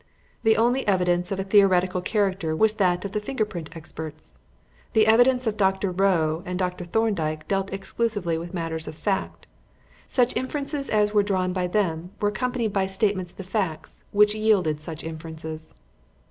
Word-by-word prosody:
The 220 -2 +4
only 240 +3 +2
evidence 180 -2 +2
of 195 - -2
a - - 0
theoretical 185 -2 +3
character 190 -5 0
was 220 +5 +4
that 185 -3 +1
of 200 - -4
the 210 - -1
finger 220 +1 -1
print 175 -7 -7
experts. 155 -1 -8 0.6
The 220 -1 +5
evidence 245 +3 +4
of 215 -2 -1
Dr. 190 -1 +1
Rowe 175 -4 +1
and 180 0 -4
of 180 -1 +1
Dr. 180 0 -9
Thorndyke 170 -6 -1
dealt 195 0 -1
exclusively 195 -2 -1
with 170 +2 -5
matters 165 -3 -3
of - - -6
fact. 195 +3 -2 0.6
Such 250 -2 +2
inferences 280 +2 -2
as 210 -1 +2
were 210 - +5
drawn 185 -2 0
by 180 -1 -1
them 175 -3 -1
were 205 - +2
accompanied 240 -1 -2
by 195 -1 +1
statements 190 -2 0
of - - -29
the 195 - -6
facts 185 -4 -2
which 210 0 +4
yielded 205 -8 +2
such 160 0 -6
inferences. 160 -1 -7
190 Hz, 175 wpm, -25 LUFS, 170-215 Hz, 0.6 s, The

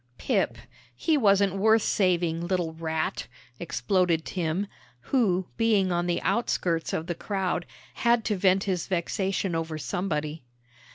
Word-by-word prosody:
"Pip! - - 0 0.4
He 320 - +1
wasn't 200 -6 +3
worth 220 +2 +4
saving, 175 -3 +1
little 175 -3 -1
rat," 160 -1 -2 0.3
exploded 175 -1 +1
Tim, 175 +2 -1 0.3
who, 190 - +1
being 215 -5 +3
on 175 0 0
the 175 - +1
outskirts 175 -8 0
of 160 - -2
the 175 - -2
crowd, 185 -2 -2 0.3
had 235 -1 +2
to 210 - +1
vent 190 0 +3
his 185 -4 -2
vexation 190 +1 -1
over 165 -1 -2
somebody. 155 +1 -3
180 Hz, 130 wpm, -27 LUFS, 165-200 Hz, 0.4 s, worth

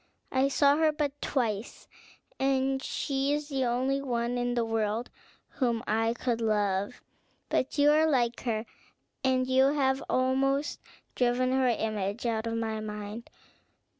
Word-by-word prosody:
I 260 +1 +3
saw 280 +1 +4
her 315 -1 +4
but 290 -1 -3
twice, 225 -5 -2 0.5
and 270 0 +1
she 275 +1 -1
is 295 0 -3
the 270 -2 0
only 260 +3 0
one 240 -2 -1
in 245 0 -1
the 235 -1 +1
world 225 +1 -1 0.4
whom 240 -4 -1
I 225 +2 +1
could 235 -1 -1
love; 205 0 0 0.5
but 260 - 0
you 290 +1 +5
are 315 +1 +4
like 240 -4 +1
her, 225 -2 -2 0.6
and 260 -1 +2
you 260 +1 +4
have 270 -2 +1
almost 270 +3 +1 0.3
driven 250 +1 +1
her 260 0 +2
image 215 -1 -1
out 225 -1 -1
of 230 - -2
my 220 -1 -2
mind. 210 +1 -6
250 Hz, 145 wpm, -29 LUFS, 225-270 Hz, 0.6 s, you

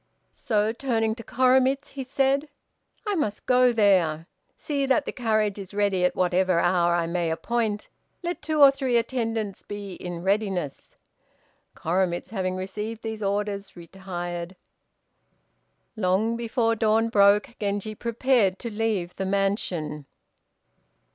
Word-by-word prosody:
So, 215 0 0
turning 230 -3 0
to 230 +1 -9
Koremitz, 260 +3 +2
he 270 -1 -6
said, 275 +2 +1 0.6
"I 415 - 0
must 215 - -2
go 250 0 +5
there. 185 -8 +3 0.3
See 280 -2 -2
that 275 +2 +2
the - - -3
carriage 215 -4 0
is 195 0 -9
ready 200 -3 +1
at 180 - +2
whatever 185 -1 +2
hour 175 0 +3
I 170 -1 +1
may 170 0 -1
appoint. 215 +4 -1 0.4
Let 345 +1 -3
two 310 0 -1
or 275 - +10
three 265 -3 0
attendants 225 -4 -2
be 205 -2 -7
in 175 -1 -6
readiness." 190 -6 -2 0.8
Koremitz, 175 +2 -1
having 185 -3 -2
received 210 +4 -5
these 220 -1 -5
orders, 200 0 -2
retired. 175 0 -6 1.4
Long 215 +3 +1
before 230 0 0
dawn 225 +1 +2
broke, 200 -1 +4
Genji 205 +1 -2
prepared 235 -3 +1
to 235 - -6
leave 210 -5 -1
the 190 - -2
mansion. 180 -7 -1
210 Hz, 130 wpm, -25 LUFS, 185-235 Hz, 1.4 s, or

